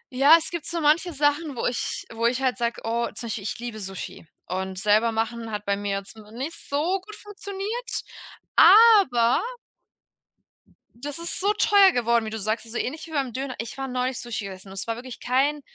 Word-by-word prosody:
Ja, 280 +5 +8
es 330 - -5
gibt 340 -3 -5
so 340 - -2
manche 315 +3 +3
Sachen, 290 0 0
wo - - -3
ich 245 - -2
wo 230 +1 +1
ich 250 +2 0
halt 255 -2 0
sage: 235 0 -1
„Oh.“ 235 +1 0
Zum 235 - -6
Beispiel, 220 -2 -4
ich 210 - -4
liebe 235 -2 -6
Sushi. 190 -4 -8 0.2
Und 190 +1 -4
selber 210 +3 +3
machen 225 +1 -2
hat 210 -1 -5
bei 200 - +1
mir 200 0 -2
jetzt 195 +1 -9 0.2
nicht 270 +8 -4 0.2
so 340 +7 0
gut 425 +3 -11
funktioniert, 415 +3 -5 0.5
aber 395 - +7 1.5
das 285 +5 -7
ist 335 0 -5
so 400 +2 +2
teuer 405 -2 +5
geworden, 235 -4 +1
wie 220 - -3
du 220 - -5
sagst. 215 +3 -2
Also 235 - -6
ähnlich 315 +6 -4
wie - - -12
beim 275 -5 -1
Döner. 265 +1 -4
Ich 230 +2 -6
war 270 0 -3
neulich 255 0 -2
Sushi 225 -4 -5
gegessen 190 0 -9
und 190 - -10
es 195 - -4
war 230 - -1
wirklich 245 0 -9
kein 275 +4 +1
250 Hz, 200 wpm, -25 LUFS, 225-315 Hz, 1.5 s, Ja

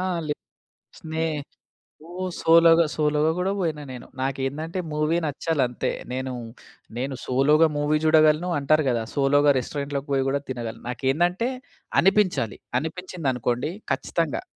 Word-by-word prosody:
ఆ! - - -1 0.2
లే 150 - -1 0.7
స్నే 160 0 -3 0.8
ఓ - - -10 0.3
సోలో‌గా, 165 0 +6
సోలో‌గా 150 +1 +2
గూడా 185 +2 0
వోయినా 155 -4 -2
నేను. 125 - -9
నాకేందంటే 135 +6 -2
మూవీ 150 +2 +1
నచ్చాలంతే. 140 -4 -1 0.2
నేను, 130 0 -3 0.6
నేను 135 +2 -2
సోలో‌గా 150 +5 +4
మూవీ 145 +1 +2
జూడగలను, 155 +2 +4
అంటారు 155 +2 +2
గదా! 115 -2 0
సోలో‌గా 145 +1 +4
రెస్టారెంట్‌లోకి 140 +2 -4
పోయి 135 -1 +2
గూడా 140 +1 0
తినగలను. 120 -3 -5
నాకేందంటే 175 - 0 0.5
అనిపించాలి. 190 - +2 0.2
అనిపించిందనుకోండి 150 -6 -2 0.2
ఖచ్చితంగా! 165 -4 -1
150 Hz, 115 wpm, -24 LUFS, 135-165 Hz, 0.8 s, సోలో‌గా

